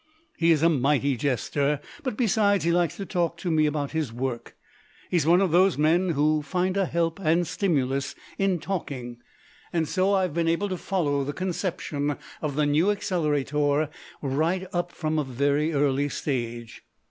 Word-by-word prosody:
He 165 Hz, -, +2 dB
is 160 Hz, -1 st, +3 dB
a 165 Hz, -, +6 dB
mighty 140 Hz, -1 st, +2 dB
jester, 140 Hz, +3 st, 0 dB, 0.2 s
but, 255 Hz, -7 st, -3 dB
besides, 205 Hz, -4 st, +2 dB
he 170 Hz, -, +2 dB
likes 170 Hz, -1 st, +1 dB
to 195 Hz, -, -4 dB
talk 170 Hz, -3 st, -1 dB
to 175 Hz, 0 st, -3 dB
me 155 Hz, -1 st, +3 dB
about 145 Hz, -2 st, -2 dB
his 155 Hz, -6 st, -2 dB
work; 120 Hz, 0 st, -4 dB, 0.6 s
he 180 Hz, -, +3 dB
is 155 Hz, -2 st, +1 dB
one 175 Hz, +3 st, +5 dB
of 190 Hz, -4 st, +2 dB
those 185 Hz, +1 st, +4 dB
men 170 Hz, +4 st, +3 dB
who 150 Hz, +1 st, +2 dB
find 185 Hz, +4 st, -1 dB
a 195 Hz, -2 st, +1 dB
help 165 Hz, +1 st, -1 dB
and 170 Hz, 0 st, +2 dB
stimulus 140 Hz, -6 st, -1 dB, 0.2 s
in 195 Hz, -2 st, +2 dB
talking, 130 Hz, -10 st, -5 dB, 0.5 s
and 165 Hz, -2 st, 0 dB
so 190 Hz, +4 st, +2 dB
I 190 Hz, -, +2 dB
have 180 Hz, -5 st, -2 dB
been 165 Hz, 0 st, 0 dB
able 170 Hz, +5 st, +1 dB
to 185 Hz, -, -2 dB
follow 150 Hz, -8 st, 0 dB
the 145 Hz, +2 st, -3 dB
conception 160 Hz, -5 st, -2 dB, 0.2 s
of 150 Hz, -3 st, -2 dB
the 150 Hz, 0 st, +2 dB
New 150 Hz, +7 st, +3 dB
Accelerator 150 Hz, -6 st, 0 dB, 0.3 s
right 160 Hz, +7 st, 0 dB
up 175 Hz, 0 st, -1 dB
from 155 Hz, -2 st, -1 dB
a -, -, +1 dB
very 140 Hz, +4 st, 0 dB
early 145 Hz, -1 st, +1 dB
stage. 120 Hz, -5 st, -4 dB
155 Hz, 180 wpm, -26 LUFS, 145-180 Hz, 0.6 s, a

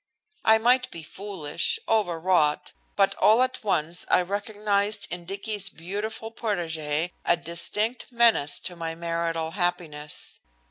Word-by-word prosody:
I 220 Hz, 0 st, +6 dB
might 250 Hz, +3 st, +3 dB
be 165 Hz, -, -8 dB
foolish, 190 Hz, -, -3 dB
overwrought, 175 Hz, -7 st, +2 dB, 0.2 s
but 195 Hz, -1 st, +4 dB
all 225 Hz, +4 st, +6 dB
at 255 Hz, -2 st, -3 dB
once 175 Hz, -4 st, 0 dB
I 180 Hz, -, +4 dB
recognized 205 Hz, +1 st, -1 dB
in 175 Hz, -1 st, -4 dB
Dicky's 200 Hz, +2 st, -1 dB
beautiful 205 Hz, +6 st, -5 dB
protégé 165 Hz, -7 st, -1 dB
a -, -, +3 dB
distinct 210 Hz, +9 st, -2 dB
menace 230 Hz, -12 st, +4 dB
to 180 Hz, -, -4 dB
my 165 Hz, -1 st, -4 dB
marital 165 Hz, -1 st, -2 dB
happiness. 175 Hz, -5 st, -3 dB
185 Hz, 125 wpm, -26 LUFS, 165-215 Hz, 0.2 s, I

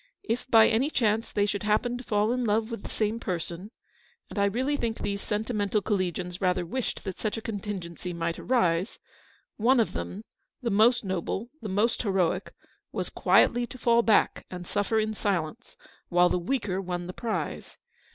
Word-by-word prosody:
If 240 Hz, +3 st, -2 dB
by 225 Hz, -2 st, +7 dB
any 245 Hz, +6 st, +2 dB
chance 225 Hz, -5 st, +1 dB
they 205 Hz, -1 st, +2 dB
should 205 Hz, -1 st, -2 dB
happen 215 Hz, +4 st, +1 dB
to -, -, -8 dB
fall 210 Hz, -1 st, +1 dB
in 250 Hz, 0 st, 0 dB
love 220 Hz, +1 st, +1 dB
with 230 Hz, -, -4 dB
the -, -, -8 dB
same 215 Hz, +1 st, -1 dB
person 180 Hz, 0 st, -4 dB, 0.3 s
— -, -, -35 dB
and -, -, -3 dB
I 200 Hz, -, +4 dB
really 255 Hz, +8 st, 0 dB
think 235 Hz, -5 st, -2 dB
these 200 Hz, 0 st, -3 dB
sentimental 210 Hz, -1 st, 0 dB
collegians 180 Hz, -2 st, -2 dB
rather 180 Hz, -1 st, +1 dB
wished 255 Hz, +8 st, -3 dB
that 190 Hz, -3 st, -5 dB
such 215 Hz, 0 st, -2 dB
a -, -, -4 dB
contingency 195 Hz, -5 st, -5 dB
might 170 Hz, -1 st, -2 dB
arise 190 Hz, -6 st, +1 dB, 0.3 s
— -, -, -34 dB
one 245 Hz, +4 st, +4 dB
of 225 Hz, -, +1 dB
them, 205 Hz, +4 st, -5 dB, 0.4 s
the 235 Hz, -3 st, -2 dB
most 230 Hz, +4 st, +4 dB
noble, 190 Hz, +5 st, -3 dB
the 215 Hz, -, -5 dB
most 210 Hz, +5 st, +1 dB
heroic, 190 Hz, -3 st, 0 dB, 0.4 s
was -, -, -3 dB
quietly 240 Hz, 0 st, +4 dB
to 255 Hz, -, -10 dB
fall 235 Hz, -1 st, +4 dB
back 225 Hz, -2 st, +2 dB
and 180 Hz, -1 st, -7 dB
suffer 205 Hz, +4 st, 0 dB
in 215 Hz, 0 st, 0 dB
silence, 200 Hz, +2 st, -2 dB, 0.3 s
while 175 Hz, 0 st, +5 dB
the 180 Hz, -, +1 dB
weaker 195 Hz, -1 st, -1 dB
won 175 Hz, -1 st, -3 dB
the 180 Hz, -, -6 dB
prize. 230 Hz, +1 st, -4 dB
210 Hz, 185 wpm, -28 LUFS, 185-230 Hz, 0.4 s, by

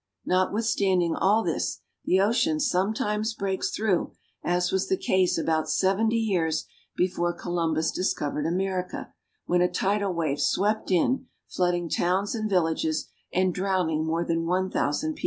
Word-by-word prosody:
Notwithstanding 185 Hz, -2 st, +1 dB
all 210 Hz, +4 st, +3 dB
this, -, -, -2 dB, 0.2 s
the 185 Hz, -, +3 dB
ocean 245 Hz, +10 st, +2 dB
sometimes 215 Hz, -2 st, 0 dB
breaks 195 Hz, -2 st, -1 dB
through, 205 Hz, -5 st, 0 dB, 0.3 s
as 175 Hz, 0 st, +1 dB
was 190 Hz, 0 st, 0 dB
the 190 Hz, -, +2 dB
case 185 Hz, -1 st, +2 dB
about 160 Hz, -1 st, 0 dB
seventy 215 Hz, +4 st, +2 dB
years 175 Hz, -8 st, 0 dB, 0.3 s
before 175 Hz, -1 st, 0 dB
Columbus 165 Hz, -2 st, -1 dB
discovered 150 Hz, -4 st, -1 dB
America, 185 Hz, +1 st, -2 dB, 0.3 s
when 175 Hz, 0 st, +2 dB
a 180 Hz, -, +3 dB
tidal 200 Hz, +2 st, 0 dB
wave 155 Hz, -4 st, -1 dB
swept 210 Hz, +2 st, +1 dB
in, 250 Hz, +9 st, +1 dB, 0.2 s
flooding 175 Hz, -1 st, 0 dB
towns 185 Hz, +5 st, 0 dB
and 215 Hz, -2 st, -2 dB
villages, 160 Hz, -4 st, 0 dB, 0.2 s
and 185 Hz, 0 st, +1 dB
drowning 180 Hz, -5 st, 0 dB
more 165 Hz, +2 st, -1 dB
than 165 Hz, 0 st, -1 dB
one 185 Hz, +2 st, 0 dB
thousand 150 Hz, -, 0 dB
people. 300 Hz, -, -15 dB
185 Hz, 140 wpm, -26 LUFS, 170-200 Hz, 0.3 s, all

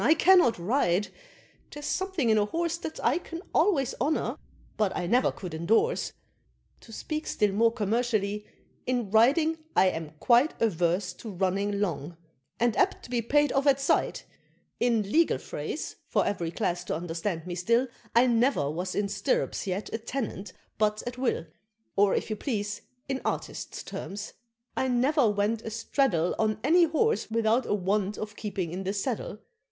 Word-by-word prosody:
I 315 Hz, -, +5 dB
cannot 350 Hz, -8 st, +5 dB
ride 190 Hz, 0 st, +1 dB, 0.6 s
there's 295 Hz, 0 st, -8 dB
something 370 Hz, -, 0 dB
in 215 Hz, -, +4 dB
a 205 Hz, -, +2 dB
horse 335 Hz, +7 st, -1 dB
That 320 Hz, -2 st, -6 dB
I 255 Hz, +8 st, +3 dB
can 335 Hz, 0 st, -8 dB
always 280 Hz, -, +2 dB
honor, 300 Hz, +4 st, 0 dB, 0.4 s
but 210 Hz, -3 st, +1 dB
I 180 Hz, -, -2 dB
never 245 Hz, +8 st, +3 dB
could 180 Hz, -4 st, -8 dB
endorse 225 Hz, -, +1 dB, 0.7 s
To 225 Hz, -, -15 dB
speak 310 Hz, +7 st, -4 dB
still 210 Hz, -1 st, +1 dB
more 225 Hz, +3 st, +3 dB
commercially, 215 Hz, -2 st, -1 dB, 0.4 s
in 245 Hz, -5 st, -1 dB
riding 300 Hz, +9 st, +4 dB, 0.2 s
I 190 Hz, -, +5 dB
am 160 Hz, -3 st, -6 dB
quite 245 Hz, +5 st, +4 dB
Averse 180 Hz, -3 st, +1 dB
to 225 Hz, -, -7 dB
running 200 Hz, +2 st, -1 dB
long, 170 Hz, -4 st, -2 dB, 0.4 s
and 235 Hz, -2 st, +2 dB
apt -, -, +2 dB
to -, -, -11 dB
be 240 Hz, -1 st, +1 dB
paid 290 Hz, +4 st, +2 dB
off 275 Hz, +1 st, +1 dB
at 275 Hz, -1 st, +5 dB
sight: 275 Hz, -, +1 dB, 0.5 s
In 235 Hz, -3 st, +2 dB
legal 330 Hz, +4 st, +3 dB
phrase, -, -, -5 dB
for -, -, +1 dB
every 170 Hz, -5 st, -1 dB
class 175 Hz, +1 st, -2 dB
to -, -, -2 dB
understand 165 Hz, +1 st, -3 dB
me 180 Hz, -, -4 dB
still, 230 Hz, +9 st, +2 dB, 0.3 s
I 235 Hz, +2 st, +6 dB
never 235 Hz, -, +2 dB
was 180 Hz, +4 st, -4 dB
in 205 Hz, 0 st, +1 dB
stirrups 200 Hz, 0 st, -1 dB
yet 190 Hz, +2 st, -3 dB
a 225 Hz, -, -1 dB
tenant 220 Hz, -5 st, -4 dB, 0.3 s
but 215 Hz, 0 st, +1 dB
at 245 Hz, +1 st, -5 dB
will; 255 Hz, -9 st, 0 dB, 0.5 s
Or, 200 Hz, 0 st, +4 dB
if -, -, -2 dB
you -, -, 0 dB
please, 205 Hz, -4 st, -3 dB, 0.3 s
in 270 Hz, -1 st, -2 dB
artist -, -, -4 dB
terms, 205 Hz, +2 st, -6 dB, 0.4 s
I 260 Hz, -, 0 dB
never 255 Hz, +1 st, +3 dB
went 205 Hz, +2 st, 0 dB
a 225 Hz, -, -5 dB
straddle 220 Hz, -, +1 dB
On 215 Hz, -1 st, +1 dB
any 340 Hz, +5 st, +5 dB
horse 440 Hz, -, +1 dB
without 230 Hz, +2 st, +2 dB
'a -, -, +2 dB
want 200 Hz, +1 st, 0 dB
of 210 Hz, -1 st, -6 dB
keeping' 195 Hz, -6 st, -4 dB
in 190 Hz, +2 st, -4 dB
the 195 Hz, +1 st, -2 dB
saddle. 210 Hz, 0 st, -3 dB
220 Hz, 170 wpm, -28 LUFS, 195-265 Hz, 0.7 s, I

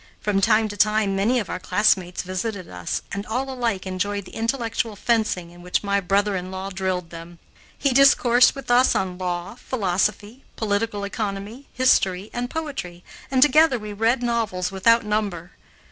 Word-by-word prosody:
From 200 Hz, -2 st, 0 dB
time 220 Hz, +1 st, +3 dB
to 205 Hz, -, -6 dB
time 210 Hz, -1 st, +2 dB
many 215 Hz, +6 st, +2 dB
of 215 Hz, -6 st, -2 dB
our 185 Hz, -, -4 dB
classmates 185 Hz, -1 st, +1 dB
visited 185 Hz, +1 st, -4 dB
us, 90 Hz, -1 st, -4 dB
and 200 Hz, -, -3 dB
all 255 Hz, +5 st, -2 dB
alike 235 Hz, -7 st, -2 dB
enjoyed 200 Hz, +2 st, -3 dB
the -, -, -13 dB
intellectual 230 Hz, -2 st, -2 dB
fencing 210 Hz, -6 st, 0 dB
in 175 Hz, 0 st, -15 dB
which 180 Hz, +3 st, -1 dB
my 200 Hz, 0 st, +1 dB
brother 200 Hz, +2 st, +1 dB
in 185 Hz, 0 st, -4 dB
law 190 Hz, +1 st, -5 dB
drilled 185 Hz, -2 st, -3 dB
them. 170 Hz, +1 st, -10 dB, 0.4 s
He 275 Hz, -, +1 dB
discoursed 255 Hz, -2 st, +5 dB
with 275 Hz, -3 st, -5 dB
us 250 Hz, +2 st, +4 dB
on 185 Hz, -1 st, -2 dB
law, 180 Hz, +1 st, -3 dB
philosophy, 210 Hz, +1 st, -2 dB
political 205 Hz, -1 st, -1 dB
economy, 205 Hz, +4 st, -5 dB
history, 200 Hz, -6 st, +2 dB
and 245 Hz, 0 st, -3 dB
poetry, 270 Hz, -, -5 dB, 0.3 s
and 260 Hz, -1 st, +4 dB
together 295 Hz, -1 st, +5 dB
we 210 Hz, -2 st, -7 dB
read 230 Hz, +4 st, +1 dB
novels 215 Hz, -7 st, -1 dB
without 230 Hz, +4 st, +3 dB
number. 200 Hz, -5 st, -2 dB
205 Hz, 165 wpm, -23 LUFS, 185-235 Hz, 0.4 s, discoursed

